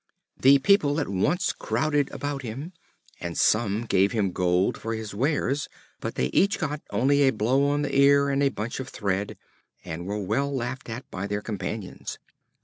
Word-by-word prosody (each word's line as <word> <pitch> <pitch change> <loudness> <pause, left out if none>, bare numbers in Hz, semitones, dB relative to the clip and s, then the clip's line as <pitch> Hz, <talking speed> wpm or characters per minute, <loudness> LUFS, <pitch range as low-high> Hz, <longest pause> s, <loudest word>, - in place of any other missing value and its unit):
The 135 +2 +7
people 145 0 +3
at 145 - -1
once 125 - +1
crowded 145 -2 0
about 145 -1 -4
him, 135 +9 -6 0.5
and 85 -1 -5
some 110 0 +2
gave 100 -2 +2
him 100 -5 +1
gold 90 +1 +1
for 115 0 -4
his 110 -2 -6
wares, 140 +4 0 0.3
but - - -5
they 65 - 0
each 200 +1 +3
got 150 -3 -3
only 140 +3 +2
a 135 - +6
blow 125 +6 +2
on 145 +1 +1
the 145 - -2
ear 140 +1 +5
and 140 0 +1
a 140 - +4
bunch 115 -1 -5
of 130 0 -5
thread, 100 -1 -2 0.5
and 85 +3 -5
were 100 +1 -2
well 110 +8 -1
laughed 130 -1 -4
at 120 +4 -6
by 95 +2 -4
their 105 0 -3
companions. 105 -2 -5
125 Hz, 180 wpm, -26 LUFS, 105-140 Hz, 0.5 s, The